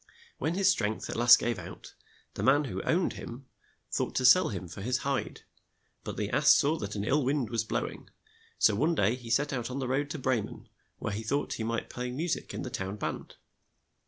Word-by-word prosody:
When 160 +2 -1
his 195 0 +2
strength 110 - 0
at - - -5
last 120 +1 +8
gave 120 -4 -2
out, 90 +2 -10 0.4
the - - -5
man 145 +3 +4
who 95 -9 -4
owned 175 +2 +1
him 125 +3 -9 0.5
thought - - -2
to 130 - +1
sell 185 +9 +7
him 95 -4 -5
for 85 +4 -9
his 125 +5 0
hide, 140 -1 -2 0.6
but - - -6
the - - -2
ass - - +3
saw 150 +3 +2
that 100 -1 -5
an 100 - -2
ill 140 +6 +2
wind 130 -3 0
was 115 -1 0
blow 110 - -1
ing, - - -11 0.5
so 110 - +4
one 155 +11 +1
day 105 -4 +2
he 125 -2 -8
set 145 +5 +1
out 120 -2 -3
on 130 - -4
the 135 -2 -2
road 140 +3 0
to 155 - -4
Bre 130 -4 +1
men, - - -10 0.3
where 105 - -4
he 105 - -3
thought 140 +6 -1
he 115 - -4
might 115 +1 -2
play 125 0 -4
mu 145 +8 -3
sic 170 - -2
in - - -5
the 125 - -6
town 100 -5 -4
band. 105 - -5
125 Hz, 230 wpm, -29 LUFS, 110-140 Hz, 0.6 s, last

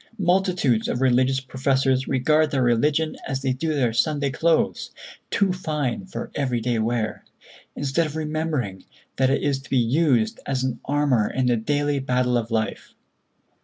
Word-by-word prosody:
Multitudes 180 - +1
of - - -2
religious 130 +1 +3
professors 130 0 0
regard 150 +4 +2
their 135 -3 0
religion 145 +7 +1
as 135 0 -3
they 130 -2 +1
do 155 +4 -2
their 125 -5 +1
Sunday 145 +3 +1
clothes, 165 +3 +1 0.4
too 195 -2 +1
fine 155 -2 -3
for - - -6
everyday 120 -4 -1
wear; 110 0 -1 0.5
instead 145 +4 0
of 150 - -8
remembering 155 - -2 0.3
that 130 -1 +3
it 135 - 0
is 140 -2 +1
to 135 -3 -15
be 135 - +1
used 120 -2 +2
as 130 -2 -1
an 130 -2 -2
armor 140 -6 +1
in 130 0 -1
the 125 -1 +3
daily 145 +5 0
battle 125 -1 0
of 115 -1 -1
life. 110 -2 -3
135 Hz, 160 wpm, -23 LUFS, 125-150 Hz, 0.5 s, religious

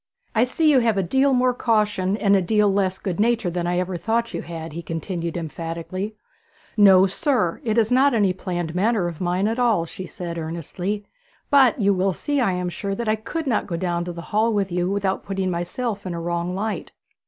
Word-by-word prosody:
'I 225 +2 +4
see 310 +5 +2
you 270 - +5
have 230 -4 +1
a 195 - +2
deal 265 +10 +2
more 250 -1 +3
caution 210 -5 +1
and 200 -2 +3
a 195 - +3
deal 210 +2 +2
less 190 -1 +1
good 185 -2 -4
nature 225 -4 +2
than 175 0 -2
I 175 0 0
ever 180 0 -1
thought 230 +5 -1
you 170 - -3
had,' 165 -2 -7
he 170 - -5
continued 170 +1 -4
emphatically. 170 +5 -5 0.6
'No, 195 -3 +7
sir; 210 - 0
it 220 -1 0
is 225 0 +3
not 265 +1 +4
any 200 -4 +3
planned 175 -3 -4
manner 200 0 +1
of 170 -1 -7
mine 180 +3 +1
at 225 +3 -1
all,' 225 -9 +2
she 185 +2 -8
said 170 -1 -6
earnestly. 175 +5 -4 0.5
'But 270 -5 +5
you 200 -1 +3
will 190 0 +1
see, 290 +9 -1
I 195 -6 +2
am 180 0 -2
sure, 195 +3 -4
that 235 +2 -4
I 215 - +3
could 230 +9 -5
not 240 -6 0
go 170 - -3
down 175 0 -1
to 175 - -4
the 170 0 -8
hall 220 +2 +3
with 200 -3 0
you 175 +1 0
without 195 -1 -1
putting 195 -1 -2
myself 200 +5 -3
in 175 - -3
a - - -4
wrong 170 +1 -2
light.' 215 +2 -3
195 Hz, 220 wpm, -23 LUFS, 175-220 Hz, 0.6 s, No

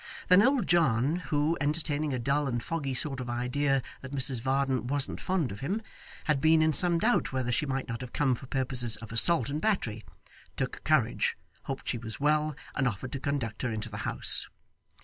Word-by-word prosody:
Then 180 +2 +8
old 255 -2 +3
John, 150 -3 +3
who, 155 -2 0
entertaining 150 0 0
a 130 - -1
dull 140 +4 0
and 120 -3 -2
foggy 140 -5 -2
sort 135 +1 0
of 125 -1 -5
idea 130 +3 0 0.2
that 130 - -8
Mrs 130 -3 +2
Varden 130 -1 0
wasn't 140 +1 -1
fond 180 -8 0
of 100 - -7
him, 185 - -1 0.4
had 150 -3 +1
been 160 +1 +5
in 155 0 +3
some 175 +2 +4
doubt 220 +7 +2
whether 130 -2 -1
she 150 +5 0
might 135 0 -2
not 120 -1 -5
have 125 -2 -7
come 135 -3 +2
for 125 +2 -6
purposes 125 -4 0
of 110 0 -9
assault 125 +3 +4
and 150 +2 -3
battery, 115 - 0 0.5
took - - -3
courage, - - +2 0.3
hoped - - -5
she 120 - -1
was 110 -1 -5
well, 150 +1 +2 0.2
and 135 - +1
offered 125 +3 -4
to 135 - -3
conduct 130 -6 -2
her 125 - -1
into 110 +1 -4
the 105 - -6
house. - - +1
135 Hz, 200 wpm, -29 LUFS, 125-155 Hz, 0.5 s, Then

